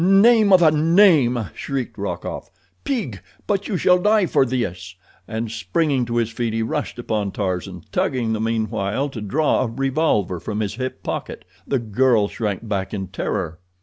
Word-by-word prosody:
"Name 205 Hz, +3 st, +5 dB
of 185 Hz, -2 st, +7 dB
a 155 Hz, -, +6 dB
name!" 155 Hz, -, +4 dB
shrieked 135 Hz, -4 st, -4 dB
Rokoff. -, -, -5 dB, 0.3 s
"Pig, 185 Hz, -, -3 dB, 0.2 s
but 200 Hz, -1 st, -1 dB
you 195 Hz, -, -1 dB
shall 180 Hz, +1 st, +4 dB
die 210 Hz, 0 st, +4 dB
for 135 Hz, -5 st, +2 dB
this," 90 Hz, -8 st, -3 dB, 0.3 s
and, 110 Hz, 0 st, -4 dB
springing 125 Hz, -, 0 dB
to 120 Hz, 0 st, -4 dB
his 115 Hz, -1 st, +1 dB
feet, 115 Hz, 0 st, -2 dB
he 115 Hz, 0 st, 0 dB
rushed 110 Hz, -, -3 dB
upon 110 Hz, -4 st, -2 dB
Tarzan, 90 Hz, -3 st, -3 dB
tugging 120 Hz, -4 st, 0 dB
the 110 Hz, -, -2 dB
meanwhile 110 Hz, +3 st, -1 dB
to 120 Hz, -5 st, -7 dB
draw 145 Hz, +9 st, +1 dB
a 130 Hz, -, 0 dB
revolver 125 Hz, -, 0 dB
from 105 Hz, +3 st, -3 dB
his 105 Hz, -1 st, -2 dB
hip 130 Hz, +2 st, -5 dB
pocket. -, -, -5 dB, 0.2 s
The 135 Hz, -, +1 dB
girl 115 Hz, -1 st, +2 dB
shrank 105 Hz, 0 st, -3 dB
back 100 Hz, -1 st, -2 dB
in 95 Hz, -2 st, -5 dB
terror. 85 Hz, -3 st, -3 dB
120 Hz, 170 wpm, -21 LUFS, 105-150 Hz, 0.3 s, of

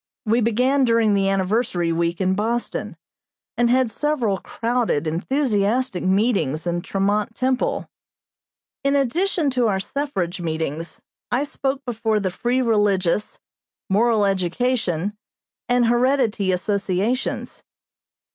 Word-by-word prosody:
We 225 Hz, +3 st, +2 dB
began 250 Hz, +5 st, +2 dB
during 230 Hz, -3 st, +3 dB
the 195 Hz, -1 st, +2 dB
Anniversary 190 Hz, -3 st, 0 dB
week 170 Hz, +1 st, -1 dB
in 190 Hz, -1 st, +2 dB
Boston, 230 Hz, +4 st, -2 dB, 0.6 s
and 240 Hz, 0 st, +2 dB
had 255 Hz, -1 st, +3 dB
several 235 Hz, -6 st, 0 dB
crowded, 230 Hz, -10 st, -1 dB
enthusiastic 220 Hz, -, 0 dB
meetings 185 Hz, -, +1 dB
in 175 Hz, 0 st, -1 dB
Tremont 205 Hz, +4 st, -1 dB
Temple. 260 Hz, 0 st, 0 dB, 1.0 s
In 275 Hz, +1 st, +2 dB
addition 300 Hz, +3 st, +1 dB
to 250 Hz, -2 st, +2 dB
our 195 Hz, -3 st, +1 dB
suffrage 190 Hz, -8 st, -3 dB
meetings, 160 Hz, 0 st, -4 dB, 0.3 s
I 250 Hz, +3 st, +2 dB
spoke 275 Hz, -1 st, -3 dB
before 220 Hz, -3 st, 0 dB
the 190 Hz, -2 st, -1 dB
Free 245 Hz, +7 st, 0 dB
Religious, 205 Hz, -4 st, +1 dB, 0.5 s
Moral 220 Hz, +1 st, +3 dB
Education, 195 Hz, -1 st, 0 dB, 0.5 s
and 245 Hz, -1 st, +3 dB
Heredity 240 Hz, -4 st, +2 dB
associations. 200 Hz, +5 st, -1 dB
220 Hz, 110 wpm, -22 LUFS, 190-250 Hz, 1.0 s, during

